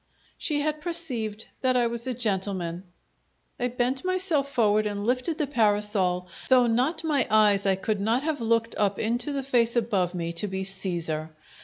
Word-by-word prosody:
She 295 Hz, -2 st, -1 dB
had 305 Hz, 0 st, -2 dB
perceived 245 Hz, -11 st, 0 dB, 0.2 s
that 255 Hz, -1 st, +2 dB
I 240 Hz, -, +3 dB
was 235 Hz, +1 st, -2 dB
a 255 Hz, -, -2 dB
gentleman. 190 Hz, -5 st, -1 dB, 0.7 s
I 245 Hz, -, +1 dB
bent 250 Hz, +2 st, -1 dB
myself 365 Hz, -7 st, 0 dB
forward 215 Hz, -4 st, +2 dB
and 205 Hz, 0 st, -4 dB
lifted 255 Hz, +7 st, 0 dB
the 300 Hz, -, 0 dB
parasol, 205 Hz, -7 st, +1 dB, 0.2 s
though 255 Hz, -2 st, +6 dB
not 255 Hz, +8 st, 0 dB
my 290 Hz, -6 st, +2 dB
eyes 205 Hz, -2 st, +4 dB
I 190 Hz, -, +4 dB
could 200 Hz, +2 st, -2 dB
not 230 Hz, +6 st, +1 dB
have 305 Hz, -4 st, -2 dB
looked 230 Hz, 0 st, +1 dB
up 200 Hz, -1 st, +1 dB
into 240 Hz, +6 st, -1 dB
the 275 Hz, -1 st, -2 dB
face 240 Hz, -3 st, +2 dB
above 195 Hz, -6 st, 0 dB
me 170 Hz, -1 st, -3 dB
to 190 Hz, +5 st, 0 dB
be 190 Hz, 0 st, -3 dB
Caesar! 175 Hz, -5 st, -3 dB
230 Hz, 175 wpm, -26 LUFS, 200-260 Hz, 0.7 s, though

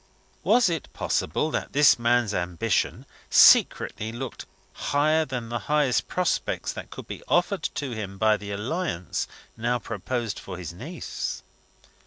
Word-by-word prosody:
Was 245 Hz, -4 st, +5 dB
it 165 Hz, -4 st, -3 dB
possible 150 Hz, -, -1 dB
that -, -, -3 dB
this 145 Hz, -3 st, +6 dB
man's 120 Hz, -2 st, +2 dB
ambition 90 Hz, -2 st, -1 dB, 0.2 s
secretly 110 Hz, +1 st, +5 dB
looked 120 Hz, +1 st, -6 dB, 0.3 s
higher 155 Hz, +2 st, +2 dB
than 125 Hz, -5 st, -5 dB
the 120 Hz, 0 st, -2 dB
highest 150 Hz, -4 st, +2 dB
prospects 180 Hz, -3 st, -1 dB
that -, -, -8 dB
could -, -, -9 dB
be -, -, -7 dB
offered 175 Hz, +1 st, +2 dB
to 140 Hz, -3 st, -3 dB
him 100 Hz, -4 st, -5 dB
by 110 Hz, +1 st, +4 dB
the 100 Hz, -1 st, -7 dB
alliance 105 Hz, -, -2 dB, 0.3 s
now 120 Hz, +2 st, 0 dB
proposed 115 Hz, +1 st, -3 dB
for 90 Hz, -2 st, -8 dB
his 85 Hz, -2 st, -6 dB
niece? 150 Hz, -, -5 dB
120 Hz, 140 wpm, -26 LUFS, 105-150 Hz, 0.3 s, this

